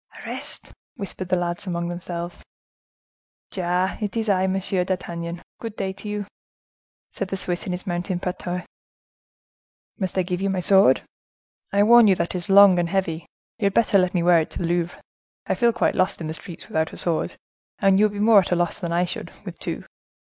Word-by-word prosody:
"Arrest!" - - -6 0.2
whispered 190 -4 -6
the 185 - +3
lads 175 +2 -3
among 170 -1 -2
themselves. 175 0 -5 1.1
"Ja, 180 0 0
it 210 +1 -2
is 220 -1 -1
I, 190 -1 +3
Monsieur 190 -1 0
d'Artagnan! 170 -2 -4 0.2
Good 225 -2 -6
day 190 -2 -3
to 200 +2 -8
you!" 210 -1 -3 0.9
said 195 - -4
the 195 - -3
Swiss, 180 -1 -2
in - - -2
his 180 0 -4
mountain 175 0 -2
patois. 180 0 -4 1.4
"Must 190 -2 -2
I 185 - +3
give 180 +1 -3
you 195 - +1
up - - 0
my 185 - -1
sword? 190 -7 +5 0.7
I 200 +1 +4
warn 235 +1 +7
you 195 - +5
that 170 -1 -2
it - - -1
is 175 - -10
long 195 -2 +8
and 170 -1 0
heavy; 170 -4 -1 0.3
you 200 - +2
had 200 - -2
better 210 -3 +4
let 185 0 +1
me 175 - +2
wear 175 -1 +6
if 160 - -2
to - - -9
the 175 - -2
Louvre: 175 0 -1 0.5
I - - 0
feel 235 -1 +3
quite - - +1
lost 185 +2 +1
in 165 - -5
the 155 - -3
streets 165 +1 -9
without 160 0 -1
a - - -8
sword, 170 -2 0 0.4
and 195 -1 +4
you 210 - +6
would 210 - 0
be 205 - -5
more 215 0 +7
at 185 - -2
a - - +4
loss 175 -1 0
that 170 -2 -3
I 175 +1 +2
should, 175 - -6
with - - -8
two." - - -4
185 Hz, 210 wpm, -23 LUFS, 175-195 Hz, 1.4 s, long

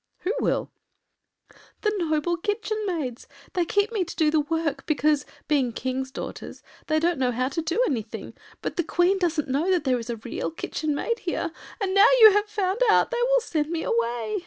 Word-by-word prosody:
” - - -46
“Who 390 - -1
will?” - - 0 1.1
“The 425 -1 +1
noble 335 -2 0
Kitchen 430 +4 -2
Maids. 285 -10 -3 0.3
They 355 -2 +1
keep 405 +5 +1
me 425 -5 0
to 340 - -8
do 310 -2 +3
the 310 - +3
work 315 0 -1
because, 300 -1 +1 0.2
being 280 -5 +2
Kings’ 260 +2 -3
daughters, - - -8 0.2
they 310 - +2
don’t 335 -2 +1
know 255 -1 +2
how 255 +2 -1
to 305 +4 -2
do 335 +6 -2
anything; 230 - -4 0.3
but - - -4
the 345 - +2
Queen 355 +4 +2
doesn’t 335 -4 0
know 285 +7 0
that 360 -4 +2
there 255 -3 +1
is 230 +1 -8
a 235 - -2
Real 225 +2 -4
Kitchen 310 -2 -3
maid 465 +10 -1
here, 345 -3 -2 0.3
and 390 -3 -1
now 395 +3 +7
you 435 -2 +10
have 415 +1 +2
found 400 0 -1
out 430 - +4
they - - -1
will - - +4
send 310 -9 -2
me 330 -1 -2
away. 230 -1 -1
325 Hz, 205 wpm, -25 LUFS, 270-385 Hz, 1.1 s, you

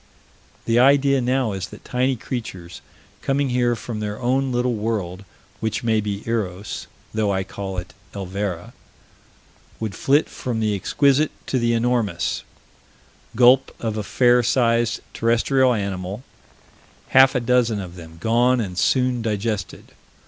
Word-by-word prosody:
The 115 +1 +3
idea 140 +1 +4
now 125 -2 +1
is 95 -1 -4
that 105 - -14
tiny 130 +1 0
creatures 95 -8 -6 0.4
coming 135 0 0
here 120 -1 +1
from 115 -1 -6
their 105 -1 -4
own 130 +2 +1
little 125 0 +1
world, 105 -4 -3 0.4
which 110 +3 -2
may 110 -2 +2
be 100 0 -4
Eros, 105 -4 -3 0.3
though 105 -2 +1
I 95 -1 0
call 95 -1 -6
it 90 0 -6 0.2
Elvera, 95 -2 -4 1.1
would 110 -3 -3
flit 145 +8 +2
from 120 -4 -4
the 110 -1 +1
exquisite 140 +8 +2 0.2
to 130 - 0
the 120 0 +1
enormous 115 -6 0 0.9
gulp 125 +3 +5
of 110 -2 -2
a 110 - -2
fair 120 +3 +3
sized 115 -1 +1
terrestrial 125 +3 +2
animal 100 0 -3 0.9
half 130 0 +6
a - - +3
dozen 120 -3 +2
of 90 -3 -7
them 80 -2 -12
gone 120 +5 +3
and 95 -5 -3
soon 125 +5 +2
digested. 105 -3 -3
115 Hz, 140 wpm, -22 LUFS, 100-125 Hz, 1.1 s, half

